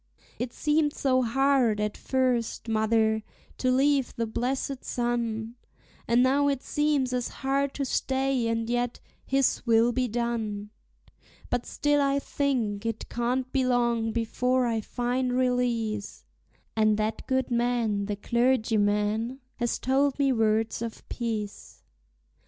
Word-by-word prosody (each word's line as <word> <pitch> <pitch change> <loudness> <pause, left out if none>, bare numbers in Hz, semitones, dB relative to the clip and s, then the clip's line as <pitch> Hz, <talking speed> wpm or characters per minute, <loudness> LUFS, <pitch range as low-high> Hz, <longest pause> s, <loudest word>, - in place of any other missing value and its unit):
It 245 0 -2
seemed 300 +1 +1
so 255 -2 +2
hard 255 -2 +2
at 210 0 -1
first, 250 -3 -1
mother, 220 0 +2 0.4
to 255 - +1
leave 270 +1 +2
the 230 - -1
blessed 255 +4 -2
sun, 235 -2 -2 0.5
And 240 +1 +4
now 280 +2 +3
it 275 -2 0
seems 295 -4 +1
as 250 -1 -1
hard 275 +1 -1
to 280 - -1
stay; 265 -2 0
and 230 0 -1
yet, 245 0 -1 0.3
His 270 0 +2
will 230 0 +4
be 255 +1 0
done! 220 -3 -3 0.8
But 245 -1 -1
still 290 0 +1
I 275 0 +2
think 250 -8 -1
it 225 -1 -4
can't 250 +2 -1
be 265 -2 +1
long 235 -3 +1
before 250 +3 +1
I 225 -2 0
find 245 +2 -1
release; 245 -4 -1 0.5
And 215 -1 +3
that 215 +1 -2
good 260 -1 0
man, 235 -4 +1
the 205 - -2
clergyman, 220 0 +1 0.2
has 240 -1 0
told 275 +1 +1
me 275 -2 +3
words 220 -1 +1
of 230 -1 -6
peace. 220 -4 -5
240 Hz, 135 wpm, -27 LUFS, 225-260 Hz, 0.8 s, And